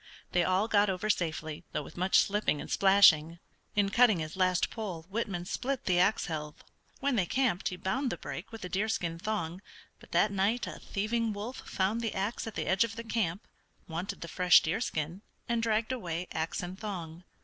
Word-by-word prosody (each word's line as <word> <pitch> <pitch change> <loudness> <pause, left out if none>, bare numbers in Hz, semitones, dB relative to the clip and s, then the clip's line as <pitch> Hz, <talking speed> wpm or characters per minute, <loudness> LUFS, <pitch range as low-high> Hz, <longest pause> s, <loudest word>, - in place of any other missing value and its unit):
They 175 - +3
all 185 +4 +2
got 205 -2 +3
over 190 +3 +1
safely, 155 -4 -3
though 150 - -1
with - - -12
much 185 +2 +3
slipping 205 -7 +2
and - - -7
splashing. 170 -5 +6 0.4
In 205 -1 +3
cutting 235 -1 +5
his 155 -1 -4
last 185 -1 +2
pole 195 -8 -5
Whitman 195 -5 -2
split 260 +6 -2
the 180 -2 +3
ax 195 +5 +3
helve. 150 -3 -5 0.4
When 275 -3 +1
they 180 -4 +2
camped 255 -9 +1
he 180 - -2
bound 240 +9 -1
the - - -3
break - - -7
with 225 -4 -7
a - - -3
deerskin 185 -4 -1
thong, 185 -3 -3 0.4
but - - -17
that 210 - +3
night 205 +5 +1
a - - -7
thieving 220 +2 -1
wolf 215 +6 -5
found 200 +5 0
the 225 -2 -2
ax 205 +4 -2
at 225 - -6
the - - -2
edge 190 +3 +3
of 225 -1 -4
the 230 - -6
camp, 215 -5 -2 0.4
wanted 170 +3 -4
the 170 - -5
fresh 180 +2 +5
deerskin, 170 -2 -2 0.3
and 235 -1 +1
dragged 225 +1 +1
away 180 -8 -3
ax 160 +2 -2
and 180 +2 -6
thong. 175 -5 -6
195 Hz, 195 wpm, -30 LUFS, 175-220 Hz, 0.4 s, splashing